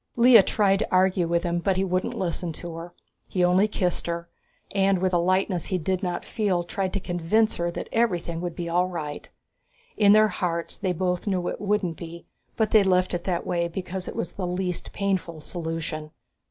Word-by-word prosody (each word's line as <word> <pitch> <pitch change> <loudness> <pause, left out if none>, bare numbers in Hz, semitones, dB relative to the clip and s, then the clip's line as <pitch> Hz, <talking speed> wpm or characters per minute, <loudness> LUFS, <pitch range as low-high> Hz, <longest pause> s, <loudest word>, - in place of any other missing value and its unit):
Lea 235 -2 +8
tried 195 -1 +2
to 220 - -2
argue 185 -1 +3
with 170 0 +1
him, 175 -1 0
but 190 +1 0
he 190 - +2
wouldn't 185 0 -1
listen 175 -2 -2
to 170 +1 -7
her. 165 +1 -8 0.3
He 180 - 0
only 180 +4 +4
kissed 180 -5 -1
her, 170 0 -3 0.4
and 195 -1 +3
with 185 0 0
a 175 - +4
lightness 185 0 +1
he 185 - 0
did 185 +2 -1
not 180 -2 -3
feel 195 -6 0
tried 190 +2 -2
to 200 - 0
convince 180 +5 +1
her 170 0 0
that 170 - -5
everything 175 -7 0
would 175 -2 -4
be 175 -1 -4
all 175 +2 +2
right. 155 -5 -6 0.7
In 205 -1 +6
their 215 0 +6
hearts 170 -3 -2
they 190 -2 -1
both 180 +2 -1
knew 185 -3 0
it - - -6
wouldn't 200 -5 0
be 170 0 -9 0.3
but 220 -2 +1
they 215 - +7
left 185 -1 +2
it 175 -1 -3
that 180 -3 -1
way 170 -1 0
because 180 +1 -5
it - - -6
was - - -3
the 185 -2 -4
least 180 0 -3
painful 190 -5 -2
solution. 160 -1 -4
180 Hz, 205 wpm, -25 LUFS, 170-195 Hz, 0.7 s, Lea